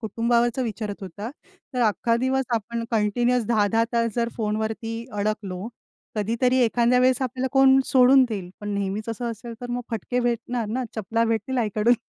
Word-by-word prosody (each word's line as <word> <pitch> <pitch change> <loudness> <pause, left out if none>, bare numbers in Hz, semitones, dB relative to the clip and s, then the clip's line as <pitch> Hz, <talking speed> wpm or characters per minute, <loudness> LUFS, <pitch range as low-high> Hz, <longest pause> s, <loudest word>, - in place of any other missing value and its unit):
कुटुंबावरचं 235 +3 +1
विचारत 215 -3 -4
होता, 200 +5 -6 0.4
तर 250 - 0
अख्खा 230 +3 +1
दिवस 265 0 +1
आपण 230 +1 -3
कंटिन्युअस 235 +2 +1
10-10 225 0 +2
तास 230 -1 +1
जर 235 -1 0
फोनवरती 220 +1 -2
अडकलो, 205 -1 -3 0.5
कधीतरी 235 +5 +1
एखांद्या 240 +2 +3
वेळेस 255 +1 +3
आपल्याला 260 +1 -2
कोण 270 -1 +6
सोडून 260 +1 +6
देईल. 195 -5 -5
पण 205 - -5
नेहमीच 200 +2 -3
असं 235 +1 -3
असेल 230 +1 -8
तर 245 0 -6
मग 245 0 -1
फटके 245 +2 -2
भेटणार 240 -1 -1
ना? 250 +3 -2
चपला 225 +2 0
भेटतील 230 +3 -1
आईकडून. 220 +1 +2
230 Hz, 160 wpm, -24 LUFS, 215-245 Hz, 0.5 s, कोण